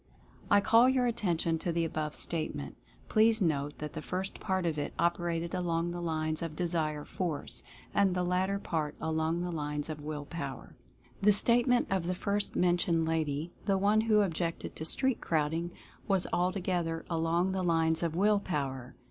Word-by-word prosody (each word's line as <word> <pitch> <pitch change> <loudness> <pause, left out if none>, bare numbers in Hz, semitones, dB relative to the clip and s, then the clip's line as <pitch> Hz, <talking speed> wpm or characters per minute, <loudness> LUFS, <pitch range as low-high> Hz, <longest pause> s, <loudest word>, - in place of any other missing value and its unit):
I 205 - +5
call 230 +4 +5
your 260 -1 +2
attention 175 -8 0
to 175 - -2
the 165 0 0
above 155 -2 -3
Statement 155 - -3 0.2
— - - -29
please 220 +1 +4
note 145 -6 0
that 150 -1 -6
the 155 - -5
first 185 +4 -4
part 190 -2 -1
of 160 -3 -1
it 145 - -4
operated 170 -1 0
along 175 -2 -1
the 175 0 -5
lines 155 -2 -1
of 165 -2 -4
Desire 155 -4 -1
Force, 165 -6 -2 0.3
and 195 -2 +3
the 180 - 0
latter 185 +2 +1
part 155 -6 -3
along 160 +1 -1
the 175 0 -3
lines 150 -1 -3
of 150 -1 -5
Will 150 -1 -5
Power. 140 -5 -7 0.5
The 210 +1 +6
Statement 240 +4 +4
of 185 -3 0
the 180 - -1
first 200 +2 -2
mentioned 175 -2 +2
lady 160 0 -1 0.2
(the 195 -1 +3
one 205 +3 +3
who 215 -1 +4
objected 170 -3 -2
to 160 - -4
street 265 - +4
crowding) 160 +2 0 0.4
was 195 -3 +2
altogether 175 -2 -1
along 170 +2 +1
the 190 0 -1
lines 165 -2 +2
of 165 -2 -1
Will 205 +3 +3
Power. 135 -9 -4
170 Hz, 175 wpm, -31 LUFS, 155-190 Hz, 0.5 s, The